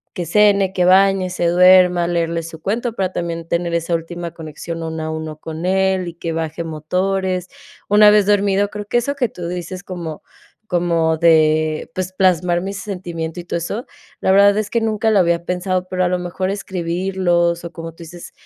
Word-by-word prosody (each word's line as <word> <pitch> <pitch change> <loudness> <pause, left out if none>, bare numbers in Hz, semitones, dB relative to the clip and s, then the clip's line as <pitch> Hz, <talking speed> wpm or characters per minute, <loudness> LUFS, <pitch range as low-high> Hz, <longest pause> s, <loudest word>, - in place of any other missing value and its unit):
que 175 - -3
cene, 200 +1 +4
que 180 -2 +1
bañe, 190 0 +4
se 180 - -2
duerma, 180 0 +5
leerle 170 -1 -1
su 160 0 -9
cuento, 230 +7 -2
para 190 -4 -2
también 170 -1 -4
tener 170 0 -1
esa 170 +1 -1
última 170 +1 -5
conexión 165 +1 -7
uno 160 -1 -4
a 155 - -3
uno 160 -1 -5
con 160 +2 -7
él 190 -1 +1
y - - -10
que 165 0 -4
baje 160 +1 -3
motores, 180 +3 -2 0.4
una 210 +1 +7
vez 210 -1 +4
dormido 200 -1 +2
creo 210 0 -6
que 225 - 0
eso 240 +4 0
que 255 -4 0
tú 180 -7 -7
dices 180 +2 -6
como 170 -5 -6 0.5
como 170 -3 +1
de 155 -1 +2
pues 185 0 -4
plasmar 180 -2 +2
mi 195 +2 -4
sentimiento 175 -4 -5
y - - -13
todo 170 - -3
eso, 200 +8 -4 0.4
la - - +2
verdad 200 +1 +5
es 215 -1 -1
que 235 - +1
nunca 220 0 0
lo 210 - +4
había 170 -1 +2
pensado. 180 +1 -2
Pero 185 0 0
a - - +2
lo 180 0 0
mejor 180 +1 -3
escribirlos 175 -2 -1
o 170 - -8
como 165 0 -7
tú 165 +1 -13
dices, 170 +1 -11
180 Hz, 195 wpm, -19 LUFS, 170-195 Hz, 0.5 s, una